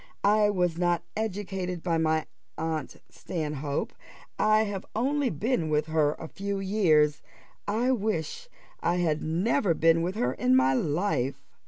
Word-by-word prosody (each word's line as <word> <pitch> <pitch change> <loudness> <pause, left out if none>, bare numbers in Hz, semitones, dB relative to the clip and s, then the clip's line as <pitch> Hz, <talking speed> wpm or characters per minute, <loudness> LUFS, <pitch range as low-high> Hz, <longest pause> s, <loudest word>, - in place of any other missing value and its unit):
I 210 0 +4
was 180 -4 0
not 175 -1 +1
educated 190 -4 -3
by 165 -3 +1
my 160 -1 +1 0.3
aunt 160 -1 -3
Stanhope 150 -4 -3 0.5
I 215 +1 +4
have 200 -3 -4
only 270 +4 +1
been 175 - -1
with 150 0 +1
her 155 -2 +2
a 160 - -8
few 200 +3 -4
years 165 -7 +3 0.5
I 230 +5 +1
wish 220 - -2 0.3
I 175 - +1
had 160 -4 0
never 180 - +1
been 165 +1 +4
with 180 +3 -2
her 125 - 0
in 125 0 +2
my 130 +1 +4
life." 145 -2 -1
175 Hz, 145 wpm, -27 LUFS, 155-205 Hz, 0.5 s, I